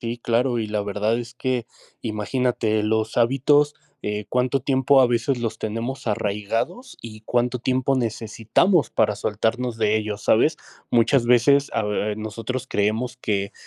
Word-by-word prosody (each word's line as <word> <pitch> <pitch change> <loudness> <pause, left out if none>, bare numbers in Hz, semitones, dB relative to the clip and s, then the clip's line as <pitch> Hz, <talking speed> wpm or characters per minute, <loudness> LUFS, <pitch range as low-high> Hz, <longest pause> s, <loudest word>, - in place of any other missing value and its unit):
Sí, 120 +1 -4
claro. 120 +1 +1
Y 110 - -2
la 105 -1 -2
verdad 105 +3 -1
es 120 0 -7
que 125 -2 -2 0.4
imagínate 110 0 -1
los 110 +1 -1
hábitos, 140 +5 +3 0.3
eh, 105 0 -3
¿cuánto 125 +1 +1
tiempo 135 +1 +3
a 130 - +6
veces 120 +2 0
los 115 -2 -3
tenemos 115 +5 -4
arraigados? 110 - -2
¿Y 110 -1 -10
cuánto 125 +2 0
tiempo 130 +2 0
necesitamos 115 - +1
para 105 - +1
soltarnos 115 +3 -1
de 110 -1 +2
ellos?, 105 -1 -3
¿sabes? 150 +8 +3 0.3
Muchas 120 +2 +3
veces, 130 +4 +4
ah 115 - 0 0.3
nosotros 115 +4 -5
creemos 110 +5 -1
que, 100 -5 -2
115 Hz, 145 wpm, -23 LUFS, 110-130 Hz, 0.4 s, a